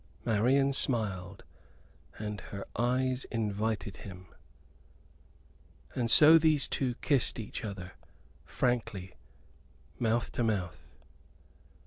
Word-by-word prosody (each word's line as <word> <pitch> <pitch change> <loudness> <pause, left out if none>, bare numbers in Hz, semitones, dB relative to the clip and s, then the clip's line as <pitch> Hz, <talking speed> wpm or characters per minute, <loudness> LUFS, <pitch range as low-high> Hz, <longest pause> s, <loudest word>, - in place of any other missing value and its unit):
Marian 130 +6 +3
smiled, 105 -10 -1 0.7
and 105 -1 -5
her 100 -1 -6
eyes 125 +2 +1
invited 105 -3 -2
him. 90 -2 -11 1.6
And 120 -2 -1
so 155 +7 +8
these 155 -3 +3
two 125 -3 -1
kissed 140 -4 +2
each 110 - -6
other 95 -4 -6 0.5
frankly, 105 -7 -2 0.9
mouth 115 0 0
to 120 - -1
mouth. 95 -6 -2
115 Hz, 90 wpm, -31 LUFS, 100-125 Hz, 1.6 s, so